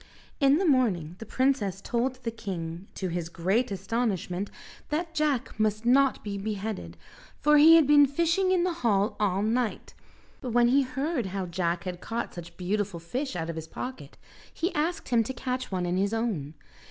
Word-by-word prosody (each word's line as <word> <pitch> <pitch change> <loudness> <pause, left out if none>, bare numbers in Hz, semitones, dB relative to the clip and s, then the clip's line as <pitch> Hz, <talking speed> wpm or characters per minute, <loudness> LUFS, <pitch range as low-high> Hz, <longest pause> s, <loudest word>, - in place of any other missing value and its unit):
In 280 0 +5
the 380 - +1
morning 205 - +2
the 225 - -8
princess 245 -9 +1
told 245 +5 -1
the 230 - -2
king, 180 -4 -6
to 185 - -3
his 170 -1 -3
great 195 +9 0
astonishment, 195 -2 -2 0.4
that 325 +2 -2
Jack 290 -8 -1
must 215 +1 0
not 265 +2 +4
be 200 -1 -4
beheaded, 210 0 -4 0.4
for 300 0 +5
he 320 +2 +9
had 325 -2 +6
been 290 0 +6
fishing 340 +6 +1
in 365 -2 +3
the 360 -1 0
hall 205 -3 +2
all 200 -1 +1
night; 230 +1 -1 0.5
but 245 -3 -4
when 240 0 +5
he 275 +3 +5
heard 265 - -2
how 190 0 -3
Jack 170 0 -1
had 180 -2 -5
caught 235 +1 -4
such 170 -1 -10
beautiful 195 0 -2
fish 255 - -4
out 165 -2 -3
of - - -9
his 160 0 -6
pocket, 255 +9 -7 0.3
he 345 +4 -2
asked 325 +4 -1
him 235 -2 +4
to 265 - -5
catch 255 -1 -4
one 180 -2 -1
in 175 +1 0
his 200 +3 +1
own. 180 -11 -2
225 Hz, 185 wpm, -27 LUFS, 185-270 Hz, 0.5 s, he